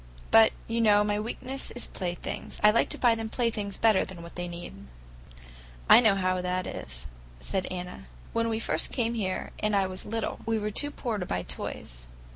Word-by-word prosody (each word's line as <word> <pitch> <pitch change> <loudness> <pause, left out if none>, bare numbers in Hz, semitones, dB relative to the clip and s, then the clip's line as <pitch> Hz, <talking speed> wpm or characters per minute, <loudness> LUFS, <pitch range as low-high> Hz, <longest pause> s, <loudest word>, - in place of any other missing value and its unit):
"But, 225 0 +8 0.2
you 230 +1 0
know, 210 -2 +5
my 205 0 0
weakness 255 +5 -4
is 245 - -3
playthings. 175 -2 -4
I 210 - +8
like 230 - +2
to - - -5
buy 240 -2 +4
them 225 -1 -3
playthings 220 -4 -1
better 220 -4 +4
than 175 -3 -8
what 170 - -10
they 175 0 -4
need." 175 - -8 1.0
"I - - +10
know 220 -5 +5
how 185 -1 +1
that 180 0 -1
is," - - -6 0.3
said 185 - -2
Anna. 180 - -6 0.3
"When 230 0 +1
we 220 -1 0
first - - +1
came 235 -2 0
here, 190 -5 -2
and 210 -1 +1
I 195 -1 +3
was 185 0 -5
little, 225 +1 -3
we 225 0 0
were 210 0 -2
too 290 +7 +2
poor 240 -7 -3
to 180 - -2
buy 90 - -1
toys. - - -6
210 Hz, 200 wpm, -28 LUFS, 180-225 Hz, 1.0 s, I